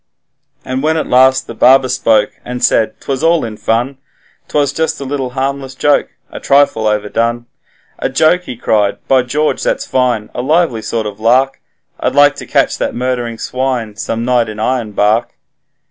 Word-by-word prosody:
And 130 +1 -3
when 160 +2 +1
at 155 - -1
last 130 +1 +4
the - - -8
barber 130 +3 +5
spoke, 115 -4 +2
and 125 0 -6
said, 110 -1 +1
''Twas 135 0 -3
all 165 -3 +2
in 110 -2 -6
fun 120 +6 -1 0.5
'Twas 145 -2 0
just 160 0 -1
a 140 - -6
little 135 -1 -3
harmless 135 0 -3
joke, 145 +2 +2 0.2
a - - -7
trifle 140 -6 +2
overdone.' 115 +3 -1 0.5
'A - - -1
joke!' 160 +6 +2
he 125 - -7
cried, 105 -3 +1
'By 130 -1 +4
George, 150 +5 -1
that's - - -1
fine; 125 -5 0
a - - -3
lively 150 -4 +1
sort 110 +1 -3
of 105 -1 -6
lark; 130 +4 +2 0.4
I'd - - -1
like 145 0 +5
to - - -8
catch - - +1
that - - -2
murdering 120 -2 -2
swine 125 -4 -3
some 115 +2 -3
night 120 -3 +1
in 105 - -7
Ironbark.' 110 -1 0
125 Hz, 175 wpm, -14 LUFS, 115-135 Hz, 0.5 s, barber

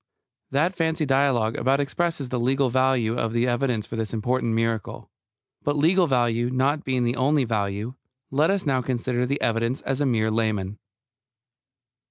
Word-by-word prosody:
That 160 +7 +1
fancy 160 -2 0
dialogue 135 -5 +2
about 135 +3 +2
expresses 145 -1 -2
the 125 0 -2
legal 130 +1 +1
value 130 -3 +2
of 115 -2 -1
the 120 +1 +1
evidence 120 -3 0
for 115 - -6
this 110 0 -3
important 115 +1 0
miracle. 115 -2 -2 0.5
But, 145 0 -1
legal 175 +4 +4
value 120 -3 +1
not 135 +4 0
being 130 -2 0
the 120 +1 0
only 140 +2 +2
value, 105 0 -2 0.4
let 150 +4 +2
us 195 -2 0
now 130 -3 +1
consider 125 0 -1
the 140 +2 -1
evidence 115 +3 0
as 135 +2 -1
mere 110 -5 +1
laymen. 105 -3 -1
125 Hz, 160 wpm, -24 LUFS, 115-140 Hz, 0.5 s, legal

